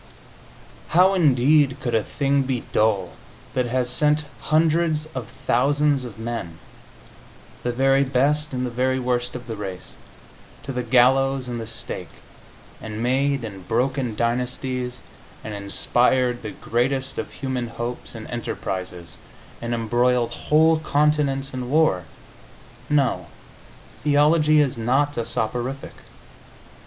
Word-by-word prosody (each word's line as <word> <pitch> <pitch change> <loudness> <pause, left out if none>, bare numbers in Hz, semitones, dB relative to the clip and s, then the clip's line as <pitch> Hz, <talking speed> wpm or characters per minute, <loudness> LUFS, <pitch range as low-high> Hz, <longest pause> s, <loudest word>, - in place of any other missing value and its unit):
How, 185 +2 +6
indeed, 145 -4 +4
could 125 -3 -3
a 110 - +3
thing 140 +5 0
be 130 -3 -2
dull 105 -4 +2 0.4
that 125 -1 0
has 125 +1 0
sent 150 +4 +1
hundreds 155 0 +2
of 130 -4 -5 0.2
thousands 145 +1 +2
of 115 -3 -9
men 115 -8 -5 1.0
the 120 - -1
very 135 +2 +3
best 145 +3 +1
and 130 -1 -2
the 125 - -4
very 130 +2 +1
worst 125 -1 -1
of 125 -1 -7
the 115 -2 -5
race 95 -3 -7 0.7
to 135 - -5
the 125 -1 -2
gallows 130 +2 +3
and 120 -1 -4
the 110 - -6
stake, 115 - -6 0.7
and 110 +1 -5
made 135 +1 +1
and 100 -5 -8
broken 125 0 0
dynasties, 125 +2 -2 0.4
and 110 - -6
inspired 120 +5 +1
the 110 - -5
greatest 130 +5 -1
of - - -4
human 130 -3 -3
hopes 120 +1 -6
and 110 - -7
enterprises, 90 -7 -5 0.4
and 115 0 -4
embroiled 120 +1 +1
whole 160 +5 +3
continents 145 -3 +1
in 125 -1 -4
war? 140 - +3 0.8
No, 140 -5 +1 0.8
theology 150 +1 +4
is 130 -5 0
not 135 +6 +1
a 115 - -2
soporific. 120 +5 -3
125 Hz, 125 wpm, -23 LUFS, 120-140 Hz, 1.0 s, How